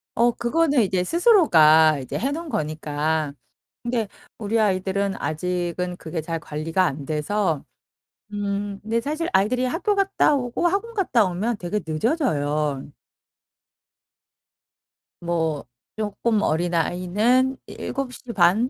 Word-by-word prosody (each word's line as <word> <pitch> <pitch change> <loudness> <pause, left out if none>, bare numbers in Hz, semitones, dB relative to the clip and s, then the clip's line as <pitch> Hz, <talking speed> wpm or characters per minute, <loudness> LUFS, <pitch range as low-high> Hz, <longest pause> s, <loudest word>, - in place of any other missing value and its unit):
어. 240 +1 +4
그거는 280 +3 +1
이제 185 -3 +1
스스로가 160 - +5
이제 130 - -5
해 275 +4 -1
놓은 325 +1 -5
거니까. 155 - -2 0.5
근데 235 -3 -1 0.3
우리 220 +1 0
아이들은 195 0 0
아직은 180 +2 -2
그게 160 -1 -5
잘 165 +1 -3
관리가 160 +4 -1
안 140 -3 -2
돼서 155 +1 -1 0.7
음 200 0 -3
근데 225 +2 0
사실 310 +5 -2
아이들이 250 +6 +2
학교 365 - 0
갔다 390 -6 +2
오고 250 +4 -1
학원 430 +6 -2
갔다 255 - +2
오면 205 +6 -2
되게 180 +4 -2
늦어져요. 150 - -1 2.3
뭐 160 -5 -1 0.3
쪼끔 215 +1 0
어린 170 +1 0
아이는 210 +11 +1
7:30 240 -5 0
200 Hz, 235 characters per minute, -23 LUFS, 160-245 Hz, 2.3 s, 스스로가